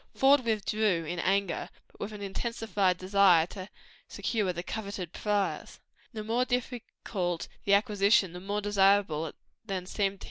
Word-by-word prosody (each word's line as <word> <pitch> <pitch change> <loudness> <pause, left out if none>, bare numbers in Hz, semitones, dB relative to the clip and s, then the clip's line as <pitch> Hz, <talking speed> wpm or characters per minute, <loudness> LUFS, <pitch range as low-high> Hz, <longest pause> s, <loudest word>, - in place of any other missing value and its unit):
Faude 270 0 +5
withdrew 215 -5 0
in 175 +3 -4
anger, 195 0 0 0.2
but - - -18
with 205 - -4
an 210 -1 -8
intensified 200 -2 -1
desire 185 -3 +4
to 185 +2 -9 0.4
secure 210 -5 -1
the 175 0 -5
coveted 200 -5 -5
prize; 205 -2 -2 0.3
the 220 -3 -6
more 230 +3 +1
difficult 230 -8 -3 0.2
of 200 - 0
acquisition, 200 -2 +3
the 180 - -7
more 200 +3 -3
desirable 195 -5 +3 0.4
it 185 -3 -3
seemed. 195 -1 -1
200 Hz, 140 wpm, -29 LUFS, 185-215 Hz, 0.4 s, Faude